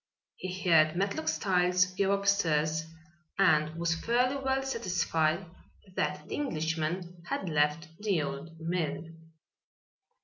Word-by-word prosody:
He 185 0 -5
heard 155 -1 +5
Matlock 195 -4 -1
Styles 180 +2 +3
go 195 +1 +1
upstairs 160 -6 +1 0.5
and 155 -5 +3
was 170 0 0
fairly 245 +9 +1
well 270 0 0
satisfied 180 -8 0 0.5
that 185 - -2
the - - -6
Englishman 170 - -2
had 190 - -2
left 150 +1 +1
the 200 -7 +1
old 155 +4 -6
mill. 165 -2 -2
175 Hz, 110 wpm, -30 LUFS, 160-195 Hz, 0.5 s, heard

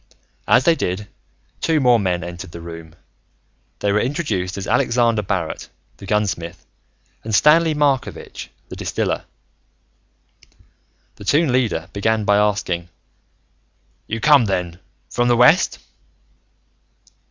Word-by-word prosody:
As 130 - +5
they 170 - +6
did, 100 - -3 0.5
two 160 -2 +2
more 125 -3 +4
men 90 -3 -1
entered 85 0 -8
the 85 - -8
room. 85 -1 -10 0.9
They 100 - +1
were 105 - +2
introduced 110 - -2
as 100 - -4
Alexander 115 -1 +2
Barrett, 95 -5 -3 0.3
the 100 - -11
gunsmith 95 -5 -2 0.6
and 110 -1 -1
Stanley 160 +3 +5
Markovitch, 145 -3 -2 0.2
the - - -7
distiller. - - -2 1.9
The - - -11
Toon 150 +4 +3
Leader 115 -10 0
began 110 +1 0
by 100 0 +4
asking, 100 -5 0 1.2
"You 115 - -3
come, 145 -1 +5
then, 90 -3 -2 0.3
from 120 0 0
the 120 -1 +3
west?" 145 - +5
105 Hz, 120 wpm, -20 LUFS, 90-125 Hz, 1.9 s, they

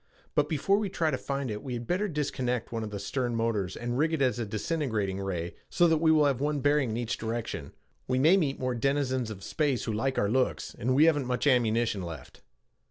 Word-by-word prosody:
"But 150 0 +2
before 195 +7 +2
we 210 -2 -2
try 165 -4 0
to 130 - 0
find 140 -3 -3
it, 105 0 -4
we 130 - -5
had 120 0 -5
better 185 - 0
disconnect 130 - -2
one 115 -1 -2
of 110 - -4
the 105 - -5
stern 120 +4 -2
motors 110 -5 -1
and 120 +1 -2
rig 160 +2 +2
it 160 - 0
as 125 -2 +1
a 115 - -2
disintegrating 110 - -1
ray 90 -3 -3 0.2
so 175 -1 +4
that 160 -1 +3
we 160 0 +4
will 155 -2 +5
have 135 -3 +1
one 145 0 0
bearing 145 -2 +2
in 110 - -2
each 120 -1 -2
direction. 110 -10 -4 0.4
We 130 - +1
may 155 +8 +6
meet 150 -8 +1
more 130 -1 -1
denizens 130 -1 0
of 100 -3 -8
space 145 -6 0
who 110 - -2
like 130 +5 -1
our 100 - +2
looks, 130 +4 0
and 130 +4 0
we 150 +3 +6
haven't 145 -5 +2
much 125 +2 -1
ammunition 115 -5 +2
left." 80 -6 -8
130 Hz, 235 wpm, -29 LUFS, 110-145 Hz, 0.4 s, may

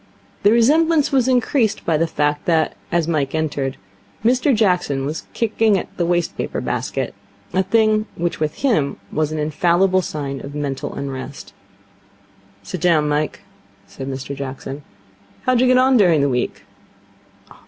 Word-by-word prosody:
The 205 - +5
resemblance 300 +6 +4
was 260 -3 +3
increased 245 -2 +1
by 165 - +2
the 165 +2 +1
fact 150 -2 -1
that, 160 -2 +2 0.2
as 170 -2 +1
Mike 150 -4 0
entered, 145 -4 -2 0.5
Mr 250 +4 +3
Jackson 180 -10 +1
was 150 +3 -5
kicking 220 -2 +2
at - - -6
the 170 - 0
waste 175 -1 0
paper - - -3
basket - - -3 0.4
a 190 - +3
thing 215 +2 +2
which 175 0 -2
with 155 -1 -1
him 180 - +1
was 155 0 0
an 155 - -3
infallible 175 +5 +2
sign 140 -5 -4
of 140 +1 -8
mental 140 -2 -3
unrest. 135 0 -6 1.1
'Sit 170 - -6
down, 165 -4 +3
Mike,' 150 +1 -1 0.4
said 135 - -8
Mr 135 +1 -5
Jackson. 135 +1 -6 0.6
'How 255 - +2
did 245 - +3
you 255 - +4
get 255 0 +5
on 260 0 +5
during 175 -8 +4
the 140 - +2
week?' 125 -1 -2
165 Hz, 155 wpm, -20 LUFS, 145-220 Hz, 1.1 s, The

